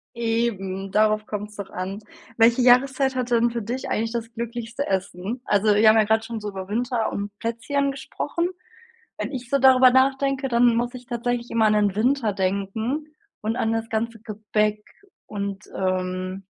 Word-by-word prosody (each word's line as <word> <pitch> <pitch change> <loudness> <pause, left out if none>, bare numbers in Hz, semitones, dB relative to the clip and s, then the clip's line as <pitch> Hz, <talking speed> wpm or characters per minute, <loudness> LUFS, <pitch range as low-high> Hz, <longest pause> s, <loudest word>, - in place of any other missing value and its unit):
Eben, 215 -5 -2
darauf 215 +1 +2
kommt's 210 0 -5
doch 200 -2 -7
an. 190 +2 -5 0.4
Welche 235 +2 +5
Jahreszeit 265 +2 +4
hat 250 -1 -2
denn 235 0 +3
für 235 0 -3
dich 240 +5 -4
eigentlich 225 +1 -1
das 230 -1 -4
glücklichste 235 +3 -4
Essen? 190 +4 -3
Also, 205 +1 +3
wir 215 +2 +5
haben 215 +1 +7
ja 220 - +6
grad 220 +1 +1
schon 230 0 -5
so 210 -1 -5
über 190 -2 -7
Winter 230 +2 -1
und 200 0 -3
Plätzchen 240 +5 -1
gesprochen. 295 +5 -3 0.7
Wenn - - -4
ich 255 -3 -6
so 280 - +3
darüber 260 -1 +7
nachdenke, 270 +1 +2
dann 240 -1 +4
muss 240 +2 -1
ich 250 -1 -10
tatsächlich 240 0 -2
immer 225 -1 +2
an 215 - +4
den 205 -2 +2
Winter 240 +1 +2
denken 200 +9 -2 0.3
und 220 +2 -1
an 225 -2 0
das 225 0 -3
ganze 225 +1 -2
Gebäck 210 -1 -1 0.4
und, 200 -1 -5
ähm 185 0 -2
225 Hz, 175 wpm, -24 LUFS, 205-245 Hz, 0.7 s, haben